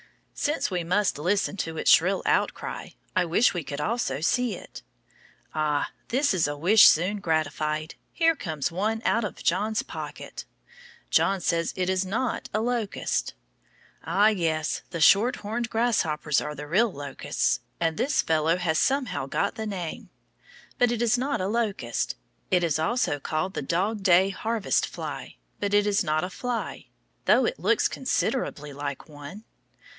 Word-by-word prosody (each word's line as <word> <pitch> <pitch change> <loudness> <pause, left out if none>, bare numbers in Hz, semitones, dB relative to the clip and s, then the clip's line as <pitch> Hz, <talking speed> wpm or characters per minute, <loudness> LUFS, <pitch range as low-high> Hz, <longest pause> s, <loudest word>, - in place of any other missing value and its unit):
Since 295 -7 -1
we 180 -2 -1
must 185 -1 +1
listen 195 +5 0
to 165 -3 -3
its - - +3
shrill - - +4
out - - +2
cry, - - -7 0.2
I 185 - +3
wish 175 +9 +3
we 175 -3 -3
could 140 0 -6
also 205 - -1
see 240 +5 +1
it. - - -11 0.7
Ah, 150 -2 0 0.2
that 275 0 +2
is 175 -5 +2
a 145 0 -4
wish 195 +8 +7
soon 185 +6 +3
gratified! 155 -3 -1 0.2
Here 330 -1 +3
comes 160 - -3
one 215 +6 -1
out 230 - +2
of 210 - -5
John's 220 +1 +1
pocket. - - -7 0.7
John 195 0 +3
says 170 -1 0
it 185 -1 0
is 190 0 +1
not 230 +7 -2
a - - +2
locust. 235 -3 -1 0.7
Ah, 205 +2 +4
yes, 160 -6 -1
the 170 - -5
shorthorned 225 +5 +3
grasshoppers 165 - +1
are 150 - -5
the 150 - -7
real 205 +9 +2
locusts, 145 -3 -1 0.2
and 165 -1 0
this 275 - +1
fellow 160 +1 +2
has 165 -3 0
somehow 250 - 0
got 200 +8 0
the 220 0 -5
name. 180 -5 -5 0.7
But 245 -1 +4
it 240 0 0
is 240 +1 +3
not 280 +3 -1
a 185 - -1
locust. 205 - -1 0.3
It 180 -1 +3
is 155 -3 +1
also 160 - 0
called 160 +6 -2
the - - -3
dog 195 +9 -1
day 190 0 +5
harvest 220 +2 0
fly, - - -7 0.2
but 205 0 0
it 205 0 +4
is 205 -1 +2
not 155 +1 0
a 185 - -4
fly, 245 +3 -4 0.4
though - - +5
it - - -2
looks - - +2
considerably 200 - -2
like 140 0 -5
one. 150 +7 -10
185 Hz, 160 wpm, -26 LUFS, 155-225 Hz, 0.7 s, wish